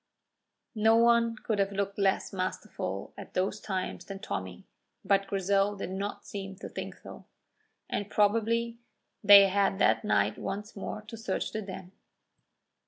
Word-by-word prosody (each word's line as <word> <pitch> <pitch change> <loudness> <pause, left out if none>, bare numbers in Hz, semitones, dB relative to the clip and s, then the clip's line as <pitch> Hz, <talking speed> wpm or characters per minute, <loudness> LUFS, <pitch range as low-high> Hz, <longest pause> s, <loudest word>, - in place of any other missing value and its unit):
No 220 0 +4
one 235 0 +4
could 220 -1 -2
have 195 0 +1
looked 200 0 -2
less 195 0 +1
masterful 185 -1 -4
at - - -11
those 190 +3 0
times 190 -3 -4
than 195 - -7
Tommy, 95 - -6 0.4
but 195 0 +2
Grizel 195 +1 +1
did 195 - -5
not 200 +2 -4
seem 195 -1 -6
to 190 - -8
think - - -6
so. - - -12 0.6
And 205 0 -3
probably 230 +3 +1 0.4
they 200 -1 +9
had 195 0 +2
that - - +3
night 105 0 +1
once 210 +2 -5
more 210 +1 -5
to 215 +2 -9
search 210 -4 -2
the 215 - -3
Den. 190 -2 -8
200 Hz, 150 wpm, -29 LUFS, 195-215 Hz, 0.6 s, they